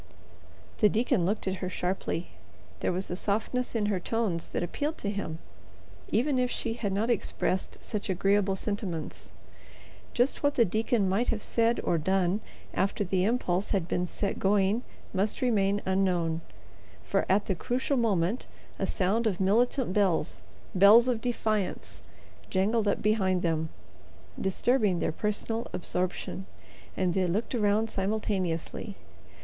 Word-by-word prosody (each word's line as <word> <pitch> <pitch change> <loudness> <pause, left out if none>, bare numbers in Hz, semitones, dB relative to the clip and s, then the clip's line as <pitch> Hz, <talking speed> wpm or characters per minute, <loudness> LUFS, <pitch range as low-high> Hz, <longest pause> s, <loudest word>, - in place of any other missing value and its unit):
The 210 - +6
deacon 220 -5 +1
looked 205 0 -1
at 190 0 -1
her 185 - -2
sharply. 180 -2 -2 0.5
There - - 0
was 185 +1 -3
a - - -1
softness 220 +6 -1
in 215 -2 +1
her 205 -3 +1
tones 190 -4 -1
that - - -2
appealed 290 - -2
to 200 - -2
him, 200 -6 -4 0.7
even 260 +4 +2
if 250 0 +2
she 230 -2 -2
had 215 -4 -2
not 215 +5 +1
expressed 190 -3 -1
such 210 -3 -4
agreeable 195 +1 +2
sentiments. 190 -6 -4 0.8
Just 245 +3 +2
what 285 0 +2
the 235 - +5
deacon 220 +1 +1
might 200 +6 +1
have 215 -2 -1
said 230 0 +2
or 170 - +1
done 190 +4 +1 0.3
after 200 +1 0
the 185 -1 +1
impulse 205 -5 0
had 190 -5 0
been 180 0 0
set 200 +3 -3
going 200 +3 +2 0.3
must 200 +2 0
remain 205 -5 +2
unknown, 180 -4 +1 0.6
for - - +1
at 195 +2 +3
the 195 - 0
crucial 250 - -1
moment 215 -3 +1 0.3
a - - 0
sound 215 +5 +1
of 190 -5 -1
militant 230 +3 +2
bells, 190 -7 +1 0.3
bells 205 +6 +7
of 235 -3 0
defiance, 215 -5 -2 0.5
jangled 205 +3 +1
up 200 - 0
behind 190 -4 +2
them, 160 -2 0 0.7
disturbing 205 0 +2
their 165 - 0
personal 210 +5 -2
absorption, 185 +1 -2 0.5
and 185 -2 +1
they 185 0 +1
looked 210 +9 -1
around 215 -1 +2
simultaneously. 195 -3 -2
200 Hz, 145 wpm, -29 LUFS, 185-225 Hz, 0.8 s, bells